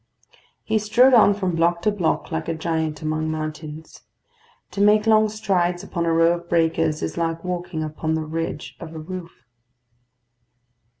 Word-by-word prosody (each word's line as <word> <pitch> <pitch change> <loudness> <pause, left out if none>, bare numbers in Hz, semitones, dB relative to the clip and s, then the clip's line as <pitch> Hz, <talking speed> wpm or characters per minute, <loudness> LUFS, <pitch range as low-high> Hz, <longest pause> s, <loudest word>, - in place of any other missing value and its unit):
He 220 0 +1
strode 240 +5 +4
on 210 -4 +6
from 185 -4 -2
block 170 +1 +1
to 210 - +3
block 180 -5 -1
like 160 0 -3
a 165 - -1
giant 160 -2 -2
among 155 0 -1
mountains. 155 0 -6 0.7
To 200 - -3
make 210 +1 +5
long 215 -1 +4
strides 185 -4 0
upon 170 -3 -3
a - - +2
row 165 +1 +4
of 170 0 -19
breakers 165 -2 +1
is - - -4
like 165 -1 -2
walking 175 -2 -3
upon 155 +1 -2
the 160 -1 -2
ridge 155 -4 -4
of 165 -1 -9
a - - -5
roof. 170 +1 -9
165 Hz, 165 wpm, -22 LUFS, 160-185 Hz, 0.7 s, on